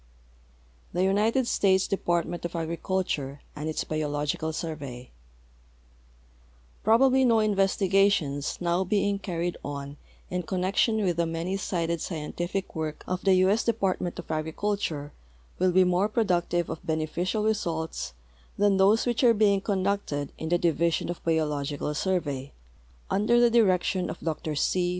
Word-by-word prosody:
THE 180 - +1
UNITED 215 +6 +2
STATES 190 -4 +2
DEPARTMENT 175 -2 -1
OF 170 0 -4
AGRICULTURE 165 -4 -2
AND 150 +1 -4
ITS 155 - -2
BIOLOGICAL 150 0 -2
SURVEY 140 -6 -6 1.7
Probably 260 +4 +5
no 235 -3 +4
investigations 195 -7 +2
now 175 +1 +1
being 200 +1 0
carried 175 -2 -3
on 140 0 -6 0.3
in 180 0 -1
connec 185 +3 -2
tion 220 -2 +3
with 175 -3 0
the 170 -1 +1
many 165 +3 -2
sided 170 -4 -2
scientific 175 +3 -4
work 155 -1 -4
of 185 0 -3
the 190 -1 +5
U. 185 +1 +4
S. 220 +3 +2
DeiDartment 195 -6 0
of - - -7
Agriculture 160 -1 -2 0.5
Avill 185 0 +3
be 185 +1 +5
more 180 +3 +2
productive 175 -6 +1
of - - -7
beneficial 165 +6 -1
results 165 - -2 0.4
than 205 -1 +3
those 200 +4 +4
which 245 +1 0
are 235 -2 +6
being 200 -2 +3
conducted 190 -8 -1
in 160 - -4
the 175 - +3
Division 170 0 +1
of 175 - -8
Biological 150 -3 -1
Surve}^, 150 -5 -1 0.6
under 220 +4 +3
the 240 -1 +5
direction 185 -5 +2
of - - -6
Dr 155 -1 -3
C. 140 - +1
180 Hz, 140 wpm, -27 LUFS, 160-200 Hz, 1.7 s, are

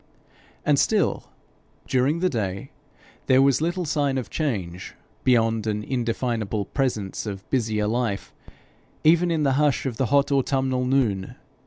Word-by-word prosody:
And - - +3
still, - - +1 0.6
during 135 +6 +1
the 185 - +3
day, 100 - -3 0.6
there 130 - +5
was 135 0 +4
little 175 +2 -1
sign 145 -3 0
of 130 - -4
change, 95 - -3 0.3
beyond 115 -3 +2
an 105 0 -1
indefinable 115 -4 -2
presence 110 -5 -2
of 95 -1 -6
busier 110 -5 0
life, 110 -2 -2 0.7
even 170 +3 +4
in 160 -2 +1
the 135 -2 +2
hush 145 -2 +1
of 125 -4 -3
the 130 - +1
hot 140 +4 +2
autumnal 130 -2 +1
noon. 120 -8 0
125 Hz, 140 wpm, -24 LUFS, 110-140 Hz, 0.7 s, there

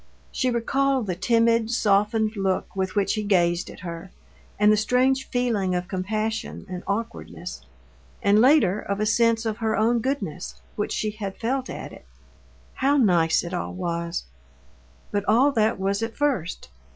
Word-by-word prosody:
She 255 - 0
recalled 265 +2 +1
the 185 - -2
timid, 230 +3 +2
softened 215 -1 +2
look 195 -2 -1
with 190 0 -2
which 200 -2 +2
he 215 - -1
gazed 175 -4 +1
at - - -11
her, 170 0 -7 0.5
and 210 +1 +5
the - - +5
strange 255 +5 +1
feeling 225 -7 0
of 180 0 -2
compassion 215 +4 -3
and 180 -1 -6
awkwardness, 200 - -4 0.6
and 205 +2 +5
later 240 - +4
of 200 -1 -3
a 215 - +1
sense 230 +1 +2
of 220 -1 -1
her 220 -1 0
own 230 +2 +3
goodness, 210 - -3 0.2
which 210 - -2
she 215 - -1
had 205 -2 -6
felt 255 +3 -2
at - - -7
it. - - -14 0.7
How 280 +2 +2
nice 175 -9 +3
it 175 +1 -6
all 180 - -3
was! 170 -1 -3 0.9
But 205 -1 0
all 250 +7 +5
that 220 -5 +1
was 200 +2 0
at 225 0 -4
first. 255 - -1
215 Hz, 165 wpm, -24 LUFS, 190-235 Hz, 0.9 s, and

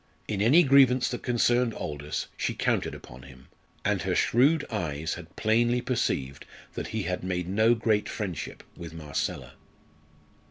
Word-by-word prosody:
In 100 -2 -2
any 140 +11 +6
grievance 130 -3 +5
that 120 - -4
concerned 120 -1 +1
Aldous 75 0 -4
she - - -2
counted - - 0
upon 65 +1 -12
him, 65 -1 -15 0.4
and - - +1
her - - -1
shrewd 140 +7 +3
eyes 80 -7 -2
had 85 0 -10
plainly 120 +3 +2
perceived 70 - -2 0.3
that - - -5
he 110 -2 -3
had 90 -1 -3
made 90 -1 -2
no 110 +5 +3
great 110 -2 0
friendship 95 -8 -5
with 85 -2 -9
Marcella. 75 -3 -4
105 Hz, 150 wpm, -27 LUFS, 80-120 Hz, 0.4 s, any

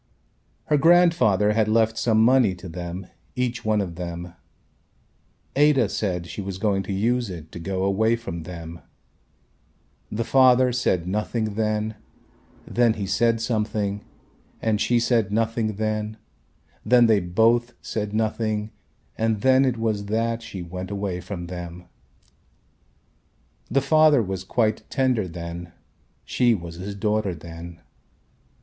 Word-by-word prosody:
Her 150 - +2
grandfather 165 - +4
had 110 0 +2
left 110 0 +2
some 110 -1 +3
money 125 -6 +4
to 90 +1 -10
them 90 +2 -6 0.3
each 125 0 -2
one 110 -1 +1
of 90 -4 -4
them. 85 0 -6 1.2
Ada 140 -6 +4
said 90 -6 -2
she 95 - -6
was 95 -1 -5
going 100 -1 +1
to 95 - -6
use 115 +4 0
it 80 -3 -9
to - - -8
go 95 +2 -2
away 110 +4 +2
from 85 -8 -6
them. 85 0 -8 1.3
The 115 +2 -1
father 130 0 +5
said 95 -8 0
nothing 105 +2 -2
then, 110 0 -1 0.7
then 120 -2 +2
he 100 - -3
said 115 +4 +1
something 105 -3 -1 0.6
and 110 -2 0
she 120 -1 +3
said 115 -3 +1
nothing 110 0 0
then, 110 0 -2 0.7
then 120 +1 +5
they 110 -3 +4
both 115 +7 +2
said 105 -2 -3
nothing 110 0 -1 0.5
and 110 -2 0
then 130 +1 +5
it 125 -3 0
was 110 -3 -1
that 115 +2 -1
she 105 -6 -7
went 90 +2 -6
away 100 -3 -3
from 90 -1 -6
them. 90 0 -8 1.8
The 135 +3 +2
father 150 -2 +5
was 95 -2 -4
quite 110 +2 0
tender 130 -7 +1
then, 85 0 -7 0.5
she 120 -2 +2
was 85 -3 -8
his 100 +3 -6
daughter 105 -2 0
then. 85 +1 -10
105 Hz, 135 wpm, -24 LUFS, 95-115 Hz, 1.8 s, father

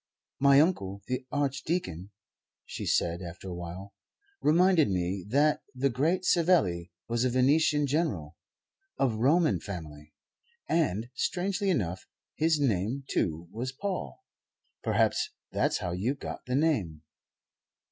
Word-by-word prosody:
"My 140 0 +6
uncle, 100 - +1
the 125 0 -3
Archdeacon," 140 - -2 0.6
she - - -6
said, 85 +1 +1
after 90 +2 -8
a 90 - -4
while, 90 +3 -7 0.5
"reminded 170 - +4
me 90 0 -1
that 145 +5 +3
the 135 +1 +1
great 165 +9 +1
Savelli 160 - +3 0.2
was 120 +1 0
a 130 - +2
Venetian 145 +4 +3
general 130 - -1 0.6
of 130 -4 +2
Roman 155 +7 +3
family; 75 -6 -8 0.5
and, 120 - 0
strangely 190 +7 -1
enough, 95 - -1 0.3
his 160 0 +2
name, 120 +1 0
too, 80 +1 -1
was 120 +5 -4
Paul. 130 - -5 0.6
Perhaps - - +1 0.2
that's - - +1
how 90 - -3
you 105 +10 -1
got 140 - -7
the 125 - 0
name." 105 - 0
125 Hz, 125 wpm, -29 LUFS, -, 0.6 s, My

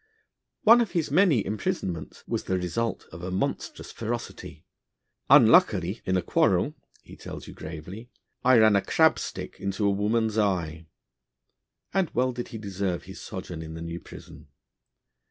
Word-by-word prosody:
One 230 +2 +8
of 225 - -2
his 165 -5 -1
many 155 - +4
imprisonments 95 -5 -3
was - - -2
the 95 - 0
result 90 +5 -2
of 80 - -9
a 90 - -4
monstrous 95 +1 -3
ferocity. 115 +1 -6 0.6
'Unluckily 95 +5 +5
in 95 0 +1
a 90 - -1
quarrel,' - - +2 0.3
he - - -13
tells - - -9
you - - -10
gravely, 85 +9 -9 0.3
'I 130 0 +6
ran 110 -2 +6
a 100 - +4
crab - - +3
stick - - -6
into 100 +1 -2
a 100 - +4
woman's 110 +2 +1
eye'; 85 -6 -1 1.1
and 190 -4 +1
well 130 +1 +2
did 120 0 -5
he 115 - -7
deserve 100 -3 -3
his - - -10
sojourn 85 -3 -7
in 80 0 -8
the 80 - -7
New 85 +1 -5
Prison. - - -13
100 Hz, 155 wpm, -26 LUFS, 90-115 Hz, 1.1 s, One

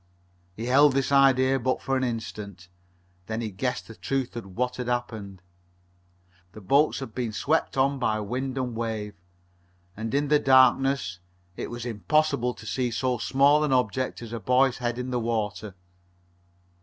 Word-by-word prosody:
He 115 - -5
held 140 +3 +5
this 135 0 0
idea 135 -1 +4
but 130 +1 0
for 135 - -1
an 130 - 0
instant. 105 -7 -5 0.6
Then 110 0 -3
he 110 -2 -4
guessed 125 +7 -3
the 115 - -10
truth 130 +2 -3
of 95 -5 -8
what 125 0 -1
had 125 -1 -4
happened. 110 -6 -4 1.1
The - - -10
boats 140 +10 +2
had 130 -5 -7
been 120 -3 -3
swept 150 +7 0
on 135 +1 +2
by 110 -4 0
wind 130 +5 -3
and 125 -3 -2
wave, 110 -2 -3 0.8
and, 110 +1 -4
in 145 0 +1
the 150 0 +5
darkness, 130 -7 +3 0.4
it - - -5
was 120 0 -6
impossible 125 +2 0
to - - -13
see 125 -2 -1
so 125 +1 -1
small 140 +8 +3
an 150 - 0
object 125 0 0
as 115 - -9
the 115 - -4
boy's 125 +4 +2
head 120 -1 -2
in 125 0 -4
the 125 - 0
water. 110 -3 -3
125 Hz, 170 wpm, -26 LUFS, 110-135 Hz, 1.1 s, held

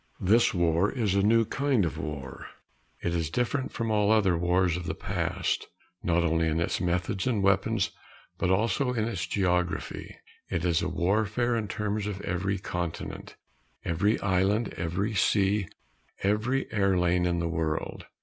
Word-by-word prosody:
This 110 +6 +4
war 85 +2 +2
is 110 -7 0
a 100 - +3
new 115 +3 +4
kind 135 -5 +1
of 80 - -4
war. 70 -4 -6 0.6
It 85 - 0
is 85 -2 -1
different 125 - -1
from 115 -1 -2
all 105 -1 +3
other 100 -5 +4
wars 90 0 +2
of 90 -1 -5
the - - -2
past, - - -2 0.3
not 85 0 +2
only 80 0 +2
in 80 +1 0
its 85 - -1
methods 90 +3 -1
and 110 -6 +1
weapons 100 +2 +2 0.5
but 90 - +1
also 115 +7 +1
in 115 -2 0
its 90 -8 -3
geography. 90 -2 -1 0.3
It 85 0 -1
is 85 -2 +2
warfare 105 +7 +1
in 110 -2 -1
terms 105 +1 -2
of 100 -2 -4
every 95 +3 -1
continent, 90 -3 -5 0.5
every 100 +6 +1
island, 100 +3 +1
every 90 +6 -2
sea, 100 -1 +2 0.6
every 110 +7 +1
air 100 -3 +2
lane 90 0 +2
in 85 -1 0
the 85 0 -1
world. 80 -1 -3
95 Hz, 160 wpm, -28 LUFS, 85-105 Hz, 0.6 s, This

